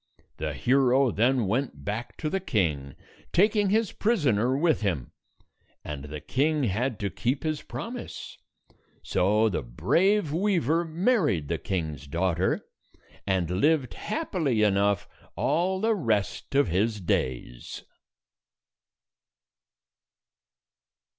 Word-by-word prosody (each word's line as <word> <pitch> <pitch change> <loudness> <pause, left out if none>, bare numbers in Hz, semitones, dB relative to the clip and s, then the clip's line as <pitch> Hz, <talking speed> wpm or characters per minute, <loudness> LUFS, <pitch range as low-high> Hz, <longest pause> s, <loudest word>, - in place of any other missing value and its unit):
The 75 -1 -3
hero 130 - +3
then 120 +3 +2
went 105 - -2
back 115 +4 -4
to 155 - -3
the 195 - 0
king, 80 - -1 0.4
taking 205 +2 +3
his 220 0 +2
prisoner 135 - +1
with 160 -2 +2
him; 85 - -2 0.7
and 75 -2 -6
the 75 +1 -6
king 145 - 0
had 120 +2 -1
to 100 -1 -1
keep 130 +4 -1
his 155 -2 -1
promise. 245 +1 -7 0.7
So 105 +4 +2
the 100 - -1
brave 170 - +1
weaver 170 - +1
married 165 - +1
the - - -1
king's 80 -7 -3
daughter, 90 +4 0 0.6
and 95 -3 +1
lived 150 -4 +2
happily 170 - -1
enough 100 -1 +2 0.3
all 180 +6 +1
the 225 +3 +2
rest 115 - -1
of 140 -4 +4
his 105 +5 0
days. 65 -8 -3
120 Hz, 110 wpm, -27 LUFS, -, 0.7 s, of